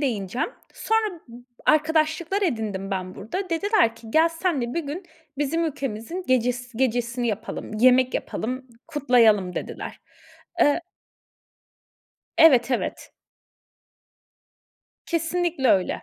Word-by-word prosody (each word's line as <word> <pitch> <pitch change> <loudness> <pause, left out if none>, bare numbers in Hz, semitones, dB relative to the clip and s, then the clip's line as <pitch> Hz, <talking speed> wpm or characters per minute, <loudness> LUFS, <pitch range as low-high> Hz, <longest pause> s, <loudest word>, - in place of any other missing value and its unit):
değineceğim. 230 -5 -1 0.3
Sonra 435 -6 0 0.5
arkadaşlıklar 315 +4 +2
edindim 215 - -2
ben 185 -1 -3
burada. 360 - -5
Dediler 335 - +2
ki, 230 - -14
"Gel, 320 +6 +5
seninle 325 -8 -2
bir 335 - 0
gün 310 +7 -5 0.4
bizim 310 +4 0
ülkemizin 275 - -4
gecesi 245 -1 0
gecesini 245 -1 0
yapalım, 215 0 -4
yemek 255 +2 +5
yapalım, 255 +3 -3 0.2
kutlayalım." 235 - +3
dediler. - - -6 0.6
Eee 290 +3 +4 1.6
Evet, 265 -6 +6
evet. 250 - -2 2.0
Kesinlikle 335 -3 0
öyle. 185 -2 +1
260 Hz, 95 wpm, -24 LUFS, 230-330 Hz, 2.0 s, Evet